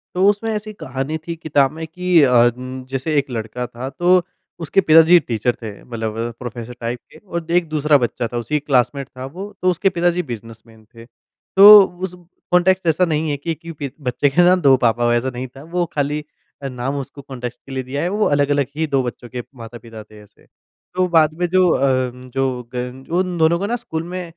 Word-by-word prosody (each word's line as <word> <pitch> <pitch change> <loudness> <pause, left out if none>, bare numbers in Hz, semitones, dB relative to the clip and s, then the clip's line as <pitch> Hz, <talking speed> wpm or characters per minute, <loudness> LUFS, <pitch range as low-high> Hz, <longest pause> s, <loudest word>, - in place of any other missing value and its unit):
तो 185 +1 +3
उसमें 210 +2 -1
ऐसी 215 0 -4
कहानी 135 -3 -4
थी 170 - -3
किताब 145 -4 +1
में 160 +1 -7
कि 180 0 +2
अ, 125 -3 +5
जैसे 130 +3 -4
एक 140 -1 0
लड़का 115 +1 -4
था 125 +2 -7
तो 175 +6 +3 0.4
उसके 165 +5 +2
पिताजी 165 +1 +6
टीचर 120 -4 -1
थे 110 -2 -5
मतलब 110 -2 -5
अ, 115 +1 -3
प्रोफ़ेसर 120 -1 -7
टाइप 120 +1 -4
के - - -15
और 170 -2 -6
एक 170 - -11
दूसरा 150 -1 +3
बच्चा 120 -2 -2
था - - -1
उसी 150 +6 -1
क्लासमेट 140 -1 0
था 130 - -6
वो 200 +2 -6
तो 185 0 +3
उसके 190 +3 +1
पिताजी 175 +1 +1
बिज़नेसमैन 115 0 -10
थे। 115 0 -12 0.5
तो 205 +2 +11 0.3
उस 180 - -15 0.4
कॉन्टेक्स्ट 180 0 +3
ऐसा 165 +3 +3
नहीं 155 -1 -1
है 145 - -1
कि 165 +4 -3
कि 155 -4 -7 0.2
बच्चे 135 +3 +1
के 160 +6 +3
ना 180 +1 +6
2 135 -1 +7
पापा 120 -1 +1
वैसा 120 +2 +1
नहीं 125 +1 -5
था 135 - -11
वो 175 -1 +2
खाली 150 +1 -1 0.4
अ, 140 - -4
नाम 130 +2 -4
उसको 140 +1 -9
कॉन्टेक्स्ट 125 -2 -7
के 135 - -12
लिए 130 -1 -3
दिया 135 +3 -4
है 175 - 0
वो 215 - +3
अलग-अलग 145 -1 +1
ही 160 0 0
2 135 -3 +1
बच्चों 120 0 -7
के 125 0 -6
माता-पिता 115 -2 -10
थे 105 0 -17
ऐसे। 105 +1 -24 0.5
तो 185 0 +2
बाद 160 -3 +3
में 175 - +1
जो 185 +1 +4
अ, 130 -3 +1
जो 125 -1 -4
ग 125 +2 -5 0.2
उन 180 -2 -3
दोनों 165 +1 +3
को 200 - -2
ना 230 +4 -1
स्कूल 160 -9 -5
में 180 +2 -5
140 Hz, 210 wpm, -19 LUFS, 125-170 Hz, 0.5 s, तो